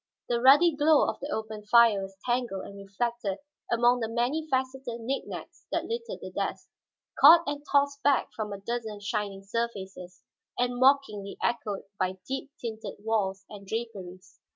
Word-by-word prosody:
The 235 -1 +1
ruddy 290 +6 +6
glow 300 0 +4
of - - -3
the 285 - -6
open 220 -4 -4
fire 225 -1 +5
was 195 0 -8
tangled 240 -6 -1
and 200 - -10
reflected 200 +1 -3 0.3
among 240 +1 +4
the 225 -2 -2
many 250 +7 -1
faceted 260 -2 -2
knickknacks 260 +4 -5
that - - -1
littered 465 0 -5
the - - -7
desk, - - -4 0.5
caught 330 +4 +9
and 290 0 -4
tossed 280 0 +2
back 285 -1 +2
from 215 -2 -4
a 200 - -4
dozen 220 0 -4
shining 205 -1 -3
surfaces, 195 -4 -5 0.3
and 245 0 0
mockingly 260 -7 +2
echoed 220 -4 -1 0.2
by 185 0 -1
deep 270 +1 -4
tinted 220 -3 -7
walls 195 -3 -1
and 200 -2 -11
draperies. 195 -5 -6
235 Hz, 155 wpm, -28 LUFS, 200-265 Hz, 0.5 s, caught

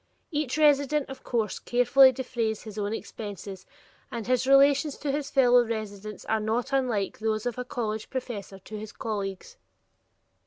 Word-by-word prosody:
Each 295 -3 -1
resident, 295 -1 +3
of 270 - -10
course, 225 -4 -1
carefully 250 +2 +5
defrays 240 -4 -3
his 215 -1 -7
own 205 0 -1
expenses, 200 -4 -7 0.4
and 235 -3 -4
his 255 +1 +1
relations 280 +1 +5
to 290 - -2
his 285 0 -2
fellow 245 -3 +5
residents 215 -3 -5
are 220 - +1
not 230 +5 -1
unlike 240 -7 0
those 215 0 -1
of 245 0 -2
a - - -1
college 220 -3 -4
professor 225 -7 -5
to 210 +3 -9
his 215 0 -8
colleagues. 205 - -5
235 Hz, 155 wpm, -27 LUFS, 215-270 Hz, 0.4 s, carefully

